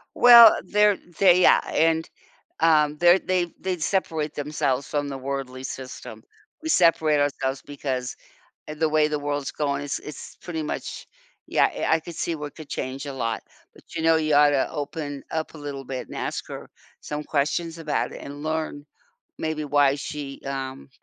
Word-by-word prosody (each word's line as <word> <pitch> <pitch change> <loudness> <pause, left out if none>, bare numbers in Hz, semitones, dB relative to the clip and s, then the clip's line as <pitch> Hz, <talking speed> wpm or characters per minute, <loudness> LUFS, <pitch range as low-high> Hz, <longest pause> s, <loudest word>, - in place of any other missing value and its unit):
Well, 235 -2 +9
they're 210 -1 +3 0.2
they 185 -2 +6
yeah, - - +6
and, 165 0 +1 0.5
um, 150 -2 +3
they're 175 +3 +6
they 185 -2 0
they 185 -1 -2
separate 160 -3 -1
themselves 145 -2 -1
from 145 -1 -2
the 135 -1 -5
worldly 130 -1 -5
system. 130 -4 -8 0.4
We 320 - -5
separate 160 - +4
ourselves, 135 -2 -1
because 130 -3 -4 0.5
eh, 150 - -5
the 160 +1 +1
way 155 0 +3
the 150 -1 -1
world's 145 -1 -3
going, 140 -2 -2
it's 145 -1 -3
it's 150 - -10
pretty 165 -3 -4
much 150 - -5 0.4
yeah, - - +3
eh - - -2
I 160 - +4
could 165 +2 -10
see 165 +1 -2
what 150 -1 -7
could 155 -3 -11
change 130 +2 -4
a 140 - -5
lot, 115 -4 -3 0.3
but, - - -17
you 160 - -2
know, 165 0 +5
you 155 -2 +1
ought 145 0 +6
to 140 -2 +1
open 145 -1 -5
up 160 0 -3
a - - -10
little 140 -2 -6
bit 130 -1 -5
and - - -9
ask - - -4
her - - -8 0.3
some 150 0 -5
questions 160 +4 -1
about 160 -2 -2
it, - - -8
and 145 +1 -8
learn 155 -2 -3 0.5
maybe 155 -1 -3
why 145 -1 +3
she, 140 -1 -6
um, 135 0 -5
150 Hz, 180 wpm, -24 LUFS, 140-160 Hz, 0.5 s, Well